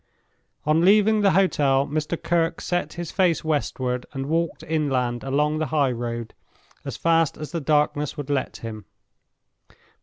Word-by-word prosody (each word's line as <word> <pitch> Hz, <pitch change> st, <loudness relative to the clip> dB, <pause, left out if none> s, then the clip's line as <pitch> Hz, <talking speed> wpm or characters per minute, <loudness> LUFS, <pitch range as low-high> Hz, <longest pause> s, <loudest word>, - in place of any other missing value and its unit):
On 155 Hz, +2 st, +3 dB
leaving 210 Hz, +3 st, +5 dB
the 200 Hz, -, +5 dB
hotel 140 Hz, -8 st, +3 dB
Mr. 155 Hz, +3 st, -2 dB
Kirke 165 Hz, 0 st, 0 dB
set 175 Hz, 0 st, -2 dB
his 175 Hz, -1 st, -6 dB
face 180 Hz, -5 st, +2 dB
westward, 130 Hz, -5 st, -1 dB
and 135 Hz, -1 st, -3 dB
walked 160 Hz, 0 st, -1 dB
inland 135 Hz, -7 st, -1 dB
along 150 Hz, +3 st, 0 dB
the 155 Hz, -, -1 dB
highroad 120 Hz, -5 st, -1 dB, 0.5 s
as -, -, -6 dB
fast 165 Hz, -2 st, +2 dB
as 155 Hz, -, -7 dB
the 170 Hz, -2 st, -3 dB
darkness 150 Hz, 0 st, +1 dB
would 145 Hz, -1 st, -4 dB
let 140 Hz, -2 st, -1 dB
him. 110 Hz, -3 st, -8 dB
150 Hz, 145 wpm, -24 LUFS, 135-165 Hz, 0.5 s, leaving